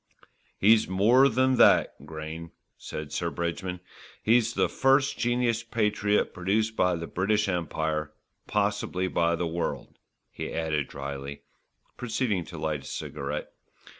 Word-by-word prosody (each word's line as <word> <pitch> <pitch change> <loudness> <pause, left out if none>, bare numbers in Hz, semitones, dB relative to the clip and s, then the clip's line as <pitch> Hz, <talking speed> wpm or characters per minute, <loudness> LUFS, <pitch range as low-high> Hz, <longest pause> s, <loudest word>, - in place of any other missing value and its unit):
"He's 110 +2 +5
more 115 +9 +5
than 130 +2 +2
that, 70 - +4
Grayne," 80 +1 -7 0.3
said 75 -1 -7
Sir 85 +1 -1
Bridgman, 90 +2 -3 0.4
"he's 120 +1 +3
the - - +3
first 135 +1 +3
genus 120 -1 +1
patriot 105 -2 0
produced 105 +4 0
by 90 -3 +2
the 85 0 -4
British 105 +5 0
Empire, 80 -4 -2 0.4
possibly 100 -3 0
by 85 -1 +1
the 85 - -2
world," 85 +1 -4 0.3
he - - -5
added 80 -3 -1
drily, 70 0 -6 0.5
proceeding 115 -5 -1
to - - -9
light 75 -2 -2
a - - -14
cigarette. 75 0 -5
95 Hz, 130 wpm, -27 LUFS, 80-110 Hz, 0.5 s, He's